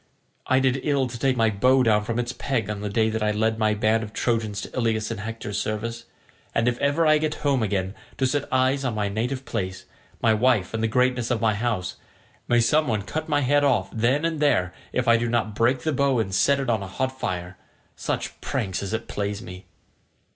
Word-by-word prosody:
I 130 - +4
did 130 0 +2
ill 140 -2 +1
to 120 -1 -7
take 130 0 +1
my 115 -1 +3
bow 130 +6 +3
down 105 -2 +3
from 115 +1 -2
its 120 0 -2
peg 115 -7 -2
on 105 -1 -5
the 105 - -3
day 110 +2 +1
I 105 0 +1
led 110 +1 0
my 110 -1 +2
band 110 +2 +2
of 110 -1 -7
Trojans 110 -4 -1
to - - -8
Ilius 115 -3 0
in 115 - -4
Hector's 105 -1 -4
service, 115 +2 -4 0.5
and 115 - +2
if 120 0 0
ever 145 +4 +2
I 155 0 +5
get 155 0 -1
home 140 -3 +3
again 95 -3 -1 0.2
to 135 - +1
set 145 +2 -1
eyes 130 +2 +2
on 125 -4 -1
my 105 -1 0
native 125 +6 -2
place, 95 -4 -4 0.3
my 115 - +3
wife, 110 -4 +2
and 110 - -1
the 115 - +2
greatness 125 +1 +1
of 120 -3 +1
my 110 -1 +2
house, 105 -4 -2 0.5
may 120 - +4
some 150 +7 +3
one 110 -4 0
cut 155 +10 -4
my 145 -1 +2
head 145 +2 +3
off 120 -9 +2
then 125 +7 +1
and 165 -2 -1
there 115 -12 +2 0.2
if 125 -1 -1
I 115 0 +6
do 120 +1 -1
not 115 -2 0
break 120 +4 +2
the 155 +2 -1
bow 140 -1 +2
and 105 -4 -1
set 140 +9 +3
it 135 - -2
on 110 -3 +1
a 100 - -5
hot 130 +7 -3
fire—such 90 -2 -5
pranks 95 -3 -2
as 100 +1 -4
it 110 +1 -3
plays 105 +1 -3
me." 90 -4 -10
115 Hz, 225 wpm, -24 LUFS, 105-130 Hz, 0.5 s, I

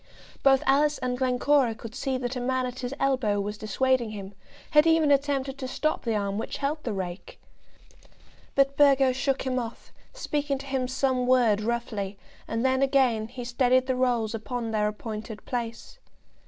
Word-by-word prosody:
Both 270 -1 +4
Alice 290 +2 +3
and 250 -1 -2
Glencora 255 -1 +2
could 220 0 -9
see 265 0 -2
that 250 0 -3
a - - -2
man 260 +1 0
at 250 +1 -6
his 245 -1 -4
elbow 255 -7 +1
was 205 +1 -4
dissuading 240 +3 +1
him, 200 -2 -8 0.4
had 300 +1 +6
even 325 -2 +4
attempted 275 -1 0
to 260 - -4
stop 310 +4 -1
the 225 -2 0
arm 200 0 -1
which - - -4
held 295 +2 -2
the 235 - -2
rake. 185 -2 -6 1.2
But 275 0 +3
Burgo 275 -2 +5
shook 265 +1 -1
him 255 -1 -1
off, 235 -1 -8 0.2
speaking 295 - -2
to 275 - -9
him 265 -2 -1
some 260 -1 0
word 240 -5 +4
roughly, 215 -3 -3 0.3
and 225 +2 -1
then 260 0 +2
again 260 -5 +2
he 245 +1 -8
steadied 250 +1 +2
the 260 -1 0
rolls 240 -3 +1
upon 230 +1 -4
their 210 -1 +1
appointed 215 0 -6
place. 240 - -5
255 Hz, 175 wpm, -27 LUFS, 225-270 Hz, 1.2 s, had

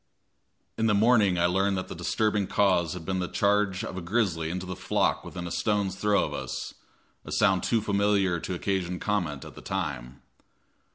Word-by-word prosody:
In 115 - +2
the 105 - +3
morning 105 -4 +4
I 85 - +3
learned 95 +2 +1
that 95 - -4
the - - -6
disturbing 105 -3 0
cause 95 -5 +2
had 90 -3 -8
been 95 +1 -1
the 90 - -1
charge 100 -1 +1
of 95 - -5
a - - -3
grizzly 85 -4 0
into 90 +2 -4
the 95 0 -5
flock 90 - 0
within 90 -1 -7
a 85 - -5
stone's 100 -3 0
throw 105 0 +2
of - - -6
us, - - -5 0.5
a - - -9
sound 95 -3 +3
too 115 -2 +1
familiar 100 -3 +1
to 90 - -4
occasion 90 -1 -2
comment 90 -9 -2
at - - -10
the - - -11
time. 70 -9 -4
95 Hz, 190 wpm, -27 LUFS, 90-105 Hz, 0.5 s, morning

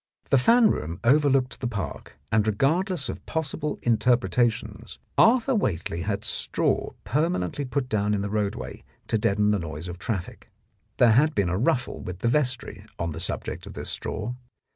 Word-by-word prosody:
The 135 - +6
fan 230 - +5
room 80 +4 -4
overlooked 135 0 +3
the 125 - -2
Park, 100 - -5
and 110 0 +3
regardless 155 - +1
of - - -6
possible 150 -1 -2
interpretations 115 -2 +1 0.2
Arthur 250 +3 +5
Whately 85 - -1
had 100 +3 -2
straw - - 0
permanently 145 - -1
put 125 +1 -2
down 105 -2 +1
in 100 - -1
the 100 - -3
roadway 105 -2 -3 0.3
to 110 - +1
deaden 105 +1 +2
the 105 - +1
noise 80 0 -6
of 90 0 -7
traffic. 95 -5 -4 0.5
There 120 -2 +6
had 150 +7 +4
been 100 -4 +2
a 90 - 0
ruffle 130 +2 0
with 90 0 -7
the - - +1
vestry 130 -2 0
on 85 -1 -2
the 80 - -6
subject. - - -4
of - - -8
this - - -6
straw. 110 +3 -4
115 Hz, 165 wpm, -26 LUFS, 100-140 Hz, 0.5 s, The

